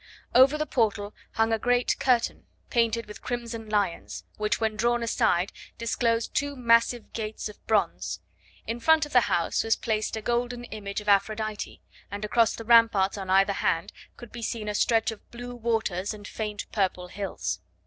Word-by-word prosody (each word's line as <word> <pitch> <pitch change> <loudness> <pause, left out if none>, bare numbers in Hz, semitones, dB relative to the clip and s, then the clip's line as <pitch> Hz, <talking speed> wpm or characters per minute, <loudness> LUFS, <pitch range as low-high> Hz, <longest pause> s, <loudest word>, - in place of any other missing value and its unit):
Over 265 +4 +6
the 305 - -1
portal 210 -6 0 0.2
hung 225 0 +2
a 225 - +1
great 245 +2 +1
curtain, 245 -3 +1 0.2
painted 230 -1 +1
with 210 - -11
crimson 235 -2 -5
lions, 200 -5 -1
which, 210 0 0
when 220 -1 0
drawn 240 +2 +1
aside, 185 -5 +1 0.3
disclosed 230 0 0
two 285 0 -1
massive 235 -1 +2
gates 215 -1 -4
of 210 - -13
bronze; - - 0 0.5
in 230 +1 -3
front 320 +5 +4
of 295 - -12
the 245 -3 +4
house 170 - +1
was 225 0 +2
placed 215 -2 -1
a - - -4
golden 240 +1 -1
image 210 -3 -5
of 210 - -14
Aphrodite, 215 +1 0 0.3
and 205 +1 -4
across 230 +1 +3
the 225 - -8
ramparts 225 -4 +5
on 195 -2 -6
either 195 +1 +4
hand 165 -3 -1 0.2
could 240 -2 -11
be 235 - -8
seen 220 -1 -3
a 210 - -1
stretch 225 +1 +2
of 220 - -12
blue 245 +1 -8
waters 220 -4 -1
and 205 -1 -10
faint 210 -2 -4
purple 185 -3 -1
hills. 185 - -3
225 Hz, 175 wpm, -27 LUFS, 205-235 Hz, 0.5 s, Over